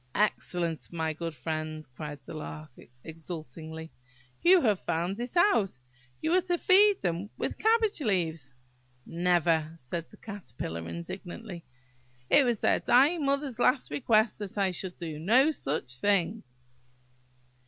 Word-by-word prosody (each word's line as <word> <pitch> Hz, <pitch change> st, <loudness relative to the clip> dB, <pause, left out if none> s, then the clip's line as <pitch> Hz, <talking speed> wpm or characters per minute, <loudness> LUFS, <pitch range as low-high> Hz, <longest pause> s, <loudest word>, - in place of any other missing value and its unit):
"Excellent! 175 Hz, -5 st, -1 dB
my 160 Hz, -2 st, -1 dB
good 165 Hz, 0 st, -5 dB
friend," 155 Hz, 0 st, -4 dB
cried 150 Hz, +1 st, -6 dB
the -, -, -8 dB
Lark 155 Hz, -1 st, -7 dB, 0.3 s
exultingly; 160 Hz, 0 st, -8 dB, 0.5 s
"you 365 Hz, +2 st, +7 dB
have 210 Hz, -6 st, +2 dB
found 175 Hz, +6 st, -2 dB
it 245 Hz, +8 st, -4 dB
out. 285 Hz, -, +3 dB, 0.5 s
You 315 Hz, -, +1 dB
are 370 Hz, -, +5 dB
to 355 Hz, -1 st, 0 dB
feed 395 Hz, +3 st, +5 dB
them 175 Hz, +3 st, -1 dB
with -, -, -3 dB
cabbage 445 Hz, -5 st, +2 dB
leaves." 165 Hz, -, -1 dB, 0.5 s
"Never! 170 Hz, -2 st, +1 dB
" -, -, -16 dB
said 165 Hz, +4 st, -6 dB
the 215 Hz, -, -16 dB
Caterpillar 115 Hz, -, -6 dB
indignantly. 175 Hz, -, -7 dB, 0.7 s
"It 285 Hz, -, +6 dB
was 235 Hz, -4 st, 0 dB
their -, -, +3 dB
dying 285 Hz, +4 st, +4 dB
mother's 275 Hz, -3 st, -1 dB
last 255 Hz, +2 st, +2 dB
request 220 Hz, -4 st, +2 dB
that 205 Hz, -1 st, -6 dB
I 195 Hz, -2 st, +2 dB
should 180 Hz, 0 st, -5 dB
do 160 Hz, -3 st, -6 dB
no 250 Hz, -, +4 dB
such 135 Hz, -, -3 dB
thing." 200 Hz, -, +1 dB
180 Hz, 140 wpm, -29 LUFS, 160-245 Hz, 0.7 s, you